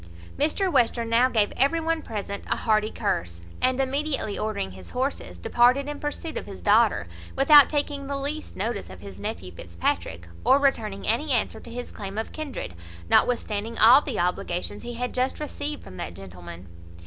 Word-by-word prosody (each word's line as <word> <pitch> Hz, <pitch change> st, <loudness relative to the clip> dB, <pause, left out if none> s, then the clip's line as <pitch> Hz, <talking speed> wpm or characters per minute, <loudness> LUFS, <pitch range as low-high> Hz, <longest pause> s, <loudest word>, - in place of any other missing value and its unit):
Mr 335 Hz, +6 st, +1 dB
Western 235 Hz, -3 st, +2 dB
now 245 Hz, +3 st, +5 dB
gave 215 Hz, -4 st, +1 dB
every 280 Hz, +6 st, +3 dB
one 325 Hz, 0 st, -1 dB
present 200 Hz, -4 st, -5 dB
a -, -, +1 dB
hearty 215 Hz, -1 st, +1 dB
curse, 85 Hz, -, -3 dB, 0.2 s
and, 255 Hz, +1 st, +2 dB
immediately 270 Hz, -4 st, -1 dB
ordering 215 Hz, -, -2 dB
his 95 Hz, 0 st, -12 dB
horses, 255 Hz, -, -3 dB
departed 245 Hz, -, +3 dB
in 295 Hz, 0 st, -5 dB
pursuit 300 Hz, +2 st, -4 dB
of -, -, -5 dB
his 195 Hz, -2 st, -10 dB
daughter, 210 Hz, -, +4 dB, 0.3 s
without 290 Hz, +1 st, +8 dB
taking 290 Hz, -2 st, -2 dB
the 280 Hz, 0 st, -2 dB
least 290 Hz, +3 st, -4 dB
notice 210 Hz, -, -3 dB
of 95 Hz, -1 st, -11 dB
his 100 Hz, -1 st, -10 dB
nephew 90 Hz, -2 st, -5 dB
Fitzpatrick, 85 Hz, -1 st, -3 dB, 0.2 s
or 265 Hz, -, +6 dB
returning 225 Hz, -8 st, 0 dB
any 280 Hz, +7 st, +1 dB
answer 240 Hz, -, +1 dB
to -, -, -12 dB
his 245 Hz, +1 st, -6 dB
claim 200 Hz, 0 st, -7 dB
of 220 Hz, -, -3 dB
kindred, 295 Hz, -, -6 dB, 0.4 s
notwithstanding 230 Hz, -2 st, +1 dB
all 240 Hz, +6 st, +8 dB
the 270 Hz, -8 st, -4 dB
obligations 180 Hz, +2 st, -2 dB
he 240 Hz, 0 st, -6 dB
had 250 Hz, +1 st, -3 dB
just 255 Hz, +1 st, 0 dB
received 295 Hz, 0 st, -4 dB
from 90 Hz, -, -11 dB
that 85 Hz, -, -5 dB
gentleman. 90 Hz, -2 st, -10 dB
230 Hz, 175 wpm, -25 LUFS, 180-275 Hz, 0.4 s, without